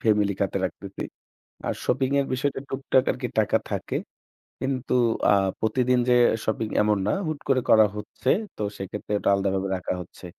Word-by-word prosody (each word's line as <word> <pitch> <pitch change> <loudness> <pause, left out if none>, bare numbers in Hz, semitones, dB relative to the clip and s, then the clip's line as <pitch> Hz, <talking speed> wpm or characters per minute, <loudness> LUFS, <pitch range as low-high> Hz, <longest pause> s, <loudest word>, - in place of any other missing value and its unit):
Family 105 -2 +3
খাতে 100 0 0
রাখতেছি। 95 +1 -5 0.7
আর - - 0
shopping 130 0 +1
এর 140 - +1
বিষয়টা 135 +1 -1
টুকটাক 135 -1 +2
আরকি 125 -1 -4
টাকা 105 - +3
থাকে। - - -2 0.6
কিন্তু 130 -1 -2 0.4
আ - - +7 0.3
প্রতিদিন 125 +3 +2
যে 125 - +6 0.3
শপিং 110 0 -1
এমন 105 0 +3
না - - +3 0.2
হুট 155 -2 -3
করে 130 -2 +4
করা 110 -1 +7
হচ্ছে। 105 +5 -4 0.3
তো - - -6 0.2
সেক্ষেত্রে 95 +2 -6
ওটা - - +1
আলাদাভাবে 95 0 0
রাখা 90 - -3
হচ্ছে। 90 - -12
110 Hz, 160 wpm, -25 LUFS, 100-130 Hz, 0.7 s, আ